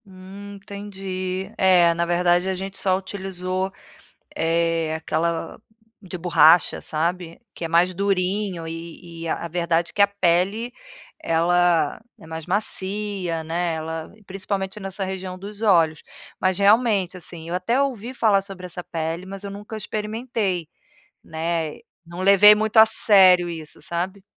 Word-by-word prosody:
Hum, 195 +1 -11
entendi. 195 -1 -6
É, 180 -3 +5
na 170 +1 -1
verdade 175 +1 +2
a 190 - -1
gente 190 +1 -6
só 185 -1 +2
utilizou, 190 -1 -4 0.6
eh, 165 -1 0
aquela 165 +1 -2 0.4
de 185 -2 -7
borracha, 170 -1 +4
sabe. 170 +2 -3
Que - - -7
é - - -2
mais 170 +2 +3
durinho 190 -1 -1
e 165 +1 -9
e - - -4
a 160 - -2
a - - -4
verdade 170 0 0
que - - -5
a 200 - +8
pele 200 +4 0 0.5
ela 170 -1 +2 0.2
é 160 - -14
mais 160 0 -7
macia, 195 -3 -2
né, 170 +1 -1
ela 160 0 -5 0.2
principalmente 195 +1 -4
nessa 195 0 -4
região 185 -1 -5
dos 205 +3 -8
olhos. 165 -7 +3 0.4
Mas, 185 -1 0
realmente, 200 -3 +3
assim, 170 -2 -9
eu 170 - -4
até 230 +9 0
ouvi 250 -4 -2
falar 215 -5 +3
sobre 190 -2 -8
essa 180 0 -7
pele 165 +1 -4
mas 195 +1 -8
eu 200 - -5
nunca 205 +2 -8
experimentei, 210 -4 -3 0.5
né. 160 -1 -3 0.3
Não 170 +2 -8
levei 200 +2 +8
muito 215 +1 -2
a 220 - +10
sério 190 -5 +6
isso, 160 -2 -9
sabe. 185 +3 -4
185 Hz, 145 wpm, -23 LUFS, 170-200 Hz, 0.6 s, a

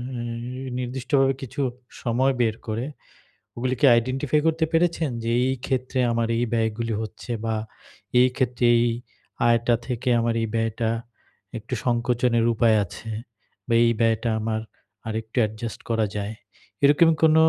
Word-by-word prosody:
নি 120 +2 -5
নির্দিষ্টভাবে 135 +2 +1
কিছু 135 +2 -4 0.4
সময় 130 +3 +2
বের 110 -2 +2
করে 110 +3 -2 0.7
ওগুলো 125 +2 -1
কি - - +4
আইডেন্টিফাই 130 +5 +1
করতে 160 0 +2
পেরেছেন? 165 -2 +2
যে 115 - -1 0.2
এই 130 - +1
ক্ষেত্রে 130 0 -1
আমার 115 -1 +1
এই 120 - +1
ব্যয়গুলি 115 0 0
হচ্ছে 110 +3 -7
বা 110 -1 0 0.6
এই 125 - +7
ক্ষেত্রে 125 -2 0
এই 120 - +3 0.6
আয়টা 120 0 +3
থেকে 125 0 -2
আমার 115 0 +1
এই 115 - 0
ব্যয়টা 115 0 0 0.7
একটু 115 +3 -7
সংকোচনের 120 -1 +2
উপায় 115 -1 +4
আছে। 110 +4 -9 0.6
বা 120 - 0
এই 115 - +4
ব্যয়টা 115 0 +2
আমার 110 0 -1 0.5
আরেকটু 110 +2 -5
অ্যাডজাস্ট 110 +1 -3
করা 115 -1 +2
যায়। 105 +2 -3 0.5
এরকম 145 +4 +6
কোন 160 -1 +6
120 Hz, 140 wpm, -24 LUFS, 115-130 Hz, 0.7 s, এই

